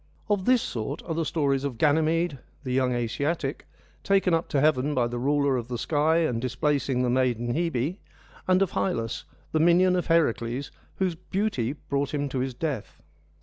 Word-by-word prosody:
Of 200 -3 +1
this 250 -2 +4
sort 120 +5 -4
are 165 - -3
the 165 +1 0
stories 140 -4 0
of 135 -5 -3
Ganymede, 160 +1 +2 0.2
the 130 -2 -3
young 130 -1 +2
Asiatic, 140 +5 -2 0.4
taken 195 -3 +3
up 165 0 0
to 140 - +1
heaven 145 0 +2
by 125 -2 +2
the 120 0 -3
ruler 140 0 +2
of 120 -2 -4
the 125 -1 -3
sky 150 +6 +2
and 115 -6 -1
displacing 130 0 0
the 125 - +1
maiden 120 -2 +1
Hebe, 165 - -1 0.5
and 185 +1 +4
of 195 - -2
Hylas, 115 - -2 0.3
the 155 - +1
minion 175 +3 +5
of 180 - -1
Heracles, 135 -5 +1 0.2
whose 185 -2 0
beauty 175 - -2
brought 140 -1 -3
him 145 -1 -1
to 130 - -2
his 130 -1 -2
death. 145 -6 -4
145 Hz, 180 wpm, -26 LUFS, 125-165 Hz, 0.5 s, minion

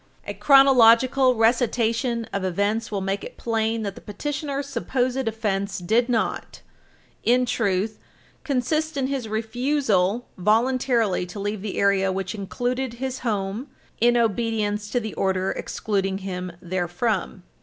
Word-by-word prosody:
A 205 - -4
chronological 255 +2 +5
recitation 230 0 +1
of 200 - -1
events 205 +5 0
will 200 -2 -2
make 195 +1 -2
it - - -9
plain 225 -1 -1
that 200 -2 -3
the - - -12
petitioner's 280 +5 -4
supposed 255 -1 -1
offense 200 -3 -1
did 225 +7 +1
not, 230 -3 -2 0.6
in 250 +2 +3
truth, 210 -2 -1 0.4
consist 305 +3 -1
in 270 - +1
his 265 -4 -3
refusal 225 -2 0
voluntarily 230 -1 +2
to 180 +4 -8
leave 205 0 -3
the 205 -1 -5
area 195 -1 +3
which 190 -1 -3
included 245 +5 -3
his 260 +1 -4
home 210 +2 -2 0.3
in 240 +1 +4
obedience 215 -2 0
to 245 - +1
the 220 -3 -5
order 190 0 0
excluding 195 -2 -2
him 185 -2 -5
therefrom. 180 +2 -2
225 Hz, 135 wpm, -24 LUFS, 195-250 Hz, 0.6 s, chronological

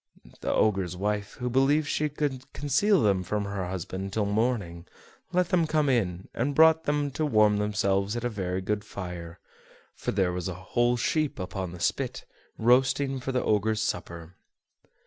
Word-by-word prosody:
The - - -2
Ogre's 95 -4 +1
wife, 105 +1 -2
who 125 -2 -4
believed 135 +5 +3
she 150 +1 0
could 140 -3 -3
conceal 170 - +2
them 100 -3 +3
from 105 +2 -2
her 100 -2 -3
husband 95 +1 -5
till 105 +1 0
morning, 100 -5 -1 0.4
let 180 -1 +1
them 170 -4 +2
come 155 -2 +2
in, 95 -8 0
and 135 +4 -1
brought 160 0 +6
them 145 -1 0
to 155 - -2
warm 110 -7 +4
themselves 105 0 0
at 120 - -3
a 120 - 0
very 95 -4 -3
good 105 +2 -2
fire; 90 -5 -7 0.6
for - - -5
there 95 -3 +1
was 90 0 -3
a 95 - -4
whole 120 +7 +1
sheep 155 +5 0
upon 95 -1 -4
the 90 - -9
spit, - - -2 0.3
roasting 130 +3 +3
for 130 +1 -3
the 130 -1 0
Ogre's 110 +1 +1
supper. 85 -3 -4
105 Hz, 170 wpm, -27 LUFS, 95-135 Hz, 0.6 s, brought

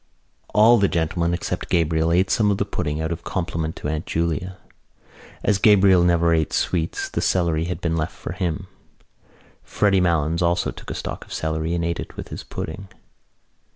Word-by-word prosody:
All 115 +3 +6
the 100 - +4
gentlemen, 85 0 0
except 85 - -3
Gabriel, 80 -1 +2
ate 90 +3 +2
some 105 -2 +3
of 100 - +1
the 100 - 0
pudding 80 -6 -3
out 80 +1 -2
of 85 0 -4
compliment 80 -2 -3
to - - -5
Aunt 75 +1 -3
Julia. 85 +2 -2 0.9
As 100 -2 +2
Gabriel 100 -4 +6
never 85 -1 +3
ate 80 -2 0
sweets 85 -2 -1
the - - -3
celery 85 -3 +1
had 90 +1 -4
been 85 -1 0
left 80 -1 -2
for - - -7
him. 90 0 -3 1.0
Freddy 100 -2 +2
Malins 85 -1 +1
also 85 0 +1
took - - -11
a - - -4
stalk - - -5
of - - -19
celery 80 +1 -2
and 85 -1 -1
ate 85 -1 -2
it - - -8
with - - -7
his - - -7
pudding. 95 +5 -6
85 Hz, 185 wpm, -22 LUFS, 80-95 Hz, 1.0 s, All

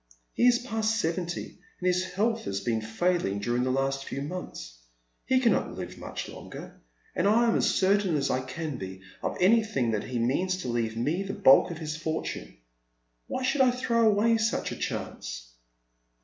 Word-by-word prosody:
He 245 - +4
is 245 -1 +6
past 225 -3 -1
seventy, 170 0 -3 0.2
and 180 - -5
his 180 0 +3
health 225 +4 0
has 100 0 -2
been 115 -1 -1
failing 110 - 0
during 120 +4 0
the 130 - 0
last 135 +1 0
few 135 0 -5
months. - - -7 0.5
He 260 +1 +4
cannot 235 -6 +1
livo - - -6
much - - -5
longer, - - -10 0.3
and 180 - +2
I 230 +3 +4
am 225 - +3
as - - +3
certain 195 -2 +2
as 140 -2 +1
I 130 - +1
can 145 +2 -5
be 95 -2 -7 0.2
of - - -2
anything 185 - +3
that 105 -2 -1
he 125 - -3
means 160 +11 +1
to - - -3
leave 115 -1 -1
me 150 +10 0
the 195 0 -4
bulk 135 -10 +6
of 170 - -5
his 155 -1 -4
fortune. 160 - -4 0.7
Why 260 - -3
should 270 +2 +2
I 260 - +6
throw 235 -2 +2
away 220 +2 +3
such 225 0 0
a - - -4
chance - - -5
170 Hz, 185 wpm, -28 LUFS, -, 0.7 s, is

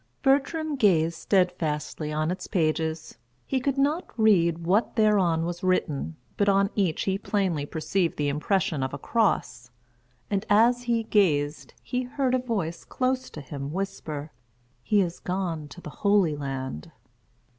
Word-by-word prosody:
Bertram 290 +3 +1
gazed 170 -8 +3
steadfastly 165 -4 0
on 155 +2 0
its 185 +1 -5
pages; 160 -3 -1 0.3
he 265 - 0
could 275 +2 -1
not 295 +6 +1
read 170 -6 +3
what 200 +7 +2
thereon 190 -7 +3
was 175 0 -4
written, 165 -4 0 0.2
but 205 0 +3
on 195 +1 +3
each 190 -6 0
he 195 0 0
plainly 185 -9 -1
perceived 170 +3 -1
the 145 - 0
impression 155 +1 0
of 130 +1 -2
a - - -5
cross; 155 - 0 0.6
and 200 -1 -1
as 235 +4 +5
he 235 -2 0
gazed, 155 -9 +1
he 250 - -2
heard 255 0 -1
a 255 - +3
voice 200 -10 -3
close 255 0 -1
to 150 - -8
him 140 +1 -6
whisper, 155 -5 -4 0.5
"He 205 - +3
is 175 -2 -2
gone 175 -5 -3
to 140 - -12
the 150 - -8
Holy 200 -7 +3
Land." 135 - -5
180 Hz, 150 wpm, -26 LUFS, 155-215 Hz, 0.6 s, as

